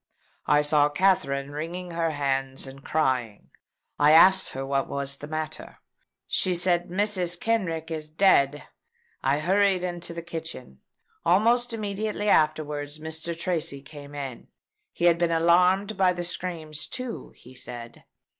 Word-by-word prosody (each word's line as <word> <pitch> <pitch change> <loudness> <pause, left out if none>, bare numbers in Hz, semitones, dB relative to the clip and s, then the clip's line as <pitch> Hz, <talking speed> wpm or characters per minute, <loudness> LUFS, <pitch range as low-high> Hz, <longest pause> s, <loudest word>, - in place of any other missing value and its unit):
I 150 0 +4
saw 150 0 +4
Katherine 150 -5 +1
wringing 170 +4 -5
her 165 -1 0
hands 135 -3 -1
and 135 +1 -11
crying. 130 -8 -1 0.5
I 145 +1 +6
asked 190 +3 +6
her 135 +1 -4
what 135 0 0
was 140 0 -3
the 145 - -9
matter? 155 -1 -6 0.5
She 185 -1 +1
said, 175 0 +1
'Mrs. 185 -2 0
Kenrick 170 -8 -1
is 155 -1 -4
dead.' 150 -4 +3 0.6
I 135 +2 +2
hurried 190 +3 +2
into 175 -1 -4
the 170 - -5
kitchen. 160 - -7 0.4
Almost 230 +8 +3
immediately 210 -1 -3
afterwards 150 -2 +1
Mr. 160 +2 -5
Tracy 165 -6 -1
came 145 0 -11
in. 135 -4 -6 0.4
He 170 - -2
had 170 -1 +5
been 170 -1 +2
alarmed 180 +5 +3
by 185 -2 +4
the 175 0 -4
screams 165 -4 -5
too, 255 -2 -6
he 125 - -16
said. 120 -2 -7
160 Hz, 140 wpm, -26 LUFS, 145-180 Hz, 0.6 s, I